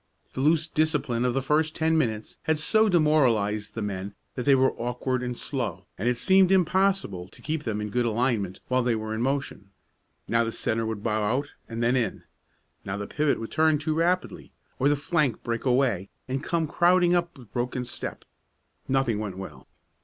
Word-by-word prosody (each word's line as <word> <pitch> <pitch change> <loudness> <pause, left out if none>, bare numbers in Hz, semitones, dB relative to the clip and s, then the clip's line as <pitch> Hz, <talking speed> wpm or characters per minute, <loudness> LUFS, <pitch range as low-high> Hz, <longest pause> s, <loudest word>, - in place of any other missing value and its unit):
The 130 - -3
loose 155 +2 +3
discipline 150 -7 0
of 125 0 +1
the 135 - 0
first 155 +3 +1
ten 160 0 +2
minutes 110 -8 -1
had 160 0 +2
so 215 +8 +3
demoralized 120 - +2
the 115 - -3
men 100 0 -4 0.2
that 125 - -4
they 140 - +7
were 130 0 +3
awkward 125 +2 -2
and 125 -1 -4
slow, - - -3
and 115 +6 0
it 125 - 0
seemed 190 +5 +4
impossible 190 - +2
to - - -17
keep 155 0 -3
them 110 -3 -2
in 105 0 -4
good 125 +1 +1
alignment 110 -5 -1
while 130 0 +2
they 120 -1 +1
were 110 0 -4
in 110 - -2
motion. 135 -6 -2 0.6
Now 115 +1 +2
the 115 - -2
centre 115 0 -1
would 110 -2 -4
bow 110 -1 0
out 130 +8 -1 0.2
and 115 0 -3
then 120 +2 +3
in; 125 -3 -1 0.6
now 95 +1 -4
the 100 - -4
pivot 150 +6 0
would 115 - -6
turn 160 -1 +3
too 155 +1 -1
rapidly, 175 +3 -1 0.3
or 140 - +3
the 145 - +3
flank 145 -4 0
break 115 +1 -3
away 125 -7 +2 0.2
and 135 +2 -3
come 165 -1 0
crowding 175 +2 +4
up 175 -2 0
with 120 -5 -16
broken 125 0 -2
step. 120 - -7 0.6
Nothing 130 -5 +1
went 100 -4 -5
well. 95 - -9
125 Hz, 195 wpm, -26 LUFS, 110-155 Hz, 0.6 s, they